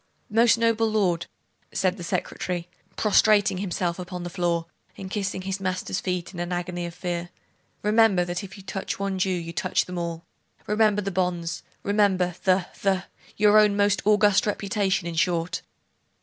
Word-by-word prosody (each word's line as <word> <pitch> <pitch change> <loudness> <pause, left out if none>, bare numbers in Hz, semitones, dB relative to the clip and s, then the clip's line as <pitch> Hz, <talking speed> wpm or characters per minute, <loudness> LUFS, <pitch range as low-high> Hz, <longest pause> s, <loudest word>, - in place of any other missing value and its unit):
'Most 230 +2 +5
noble 230 -1 +2
lord,' 180 -6 +1 0.4
said 185 -1 +1
the 175 - -7
secretary, 175 0 -3 0.3
prostrating 205 -2 +4
himself 180 -2 -2
upon 180 0 -6
the 175 - -5
floor, 170 -2 0 0.3
and 190 -1 -7
kissing 190 -3 -2
his 195 +1 -3
master's 185 0 -2
feet 180 0 -3
in 175 - -7
an 175 +1 -3
agony 175 0 -3
of 170 - -9
fear.... 175 -1 -3 0.5
'Remember, 210 -4 +4
that 175 +3 -3
if 195 +1 -9
you 195 - -12
touch 195 0 -4
one 195 -1 -2
Jew 190 - +2
you 170 -2 -3
touch 185 +2 0
all! 170 -2 -4 0.4
Remember 210 -1 +2
the 200 - -2
bonds! 175 -3 -1 0.2
remember 195 -3 +2
the 185 -1 +3 0.2
the 190 -1 +1 0.3
your 210 0 +6
own 210 -1 +4
most 205 0 +3
august 210 -1 +4
reputation, 200 -3 0
in 170 - -4
short. 170 +1 0
185 Hz, 165 wpm, -25 LUFS, 175-205 Hz, 0.5 s, your